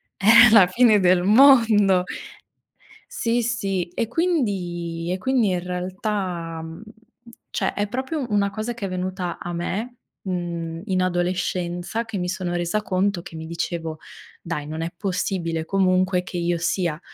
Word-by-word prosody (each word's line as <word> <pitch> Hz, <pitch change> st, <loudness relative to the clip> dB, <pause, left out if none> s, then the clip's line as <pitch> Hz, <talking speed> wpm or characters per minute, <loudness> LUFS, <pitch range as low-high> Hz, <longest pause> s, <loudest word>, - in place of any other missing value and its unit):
è 230 Hz, +3 st, +7 dB
la 200 Hz, -5 st, +7 dB
fine 215 Hz, +1 st, +4 dB
del 180 Hz, -1 st, +3 dB
mondo. 215 Hz, -5 st, +5 dB, 1.0 s
Sì, 240 Hz, -, -1 dB
sì. 195 Hz, -6 st, -1 dB
E 225 Hz, +5 st, -2 dB
quindi 180 Hz, -, -1 dB
e 185 Hz, -, -2 dB
quindi 255 Hz, -4 st, +1 dB
in 180 Hz, -, 0 dB
realtà, 180 Hz, -2 st, -4 dB
mhmm, 165 Hz, +4 st, -9 dB, 0.7 s
cioè, -, -, -1 dB
è 205 Hz, 0 st, -1 dB
proprio 260 Hz, +5 st, -3 dB
una 200 Hz, -1 st, +2 dB
cosa 220 Hz, +3 st, -4 dB
che 220 Hz, -4 st, -5 dB
è -, -, -6 dB
venuta 185 Hz, -1 st, -3 dB
a 175 Hz, -, -6 dB
me, 215 Hz, +8 st, -4 dB, 0.3 s
mhmm, 170 Hz, -3 st, -4 dB
in 185 Hz, -3 st, 0 dB
adolescenza 180 Hz, +3 st, -2 dB
che 215 Hz, -3 st, -6 dB
mi 180 Hz, 0 st, -2 dB
sono 180 Hz, -2 st, -3 dB
resa 175 Hz, +5 st, -1 dB
conto 190 Hz, -2 st, 0 dB
che 165 Hz, -, -11 dB
mi 160 Hz, 0 st, -7 dB
dicevo: 165 Hz, -1 st, -4 dB, 0.4 s
"Dai, 160 Hz, -4 st, -4 dB
non 155 Hz, +2 st, -5 dB
è 165 Hz, +1 st, -3 dB
possibile 175 Hz, -4 st, -2 dB
comunque 185 Hz, -1 st, +2 dB
che 180 Hz, -1 st, -6 dB
io 170 Hz, 0 st, 0 dB
sia 170 Hz, -1 st, -1 dB
185 Hz, 150 wpm, -23 LUFS, 175-215 Hz, 1.0 s, è